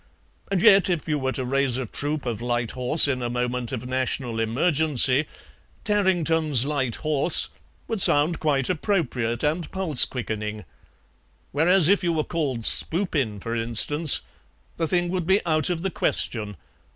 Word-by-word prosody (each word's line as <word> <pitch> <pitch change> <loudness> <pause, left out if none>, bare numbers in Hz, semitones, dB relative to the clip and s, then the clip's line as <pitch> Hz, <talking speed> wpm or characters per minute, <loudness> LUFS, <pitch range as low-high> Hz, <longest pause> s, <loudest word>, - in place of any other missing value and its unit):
And 195 -3 -1
yet 195 -1 +6
if 170 -4 -2
you 150 -1 -1
were 130 -1 -2
to 130 - -2
raise 135 -1 0
a 130 - -3
troop 145 +5 -4
of 115 -3 -4
light 120 -1 -2
horse 130 +5 +3
in 130 -3 -2
a 120 - -3
moment 125 0 -3
of 125 -2 -5
national 130 -2 -2
emergency, 140 +3 +1 0.6
'Tarrington's 165 - +1
Light 135 -5 -1
Horse' 155 +1 +1 0.4
would 225 -4 -1
sound 155 +2 +5
quite 140 -4 0
appropriate 135 - -2
and 155 +3 -1
pulse 185 -8 +4
quickening; 110 -4 -5 0.9
whereas 165 +3 +3
if 200 +1 +2
you 170 -1 0
were 155 -1 0
called 145 -9 -3
Spoopin, 150 - -1
for 115 +1 -4
instance, 120 +7 +1 0.6
the 165 - -1
thing 175 +1 0
would 180 -2 -3
be 190 +1 +2
out 155 -1 +1
of 175 -1 -3
the 195 - -2
question. 105 - -1
145 Hz, 155 wpm, -23 LUFS, 125-170 Hz, 0.9 s, yet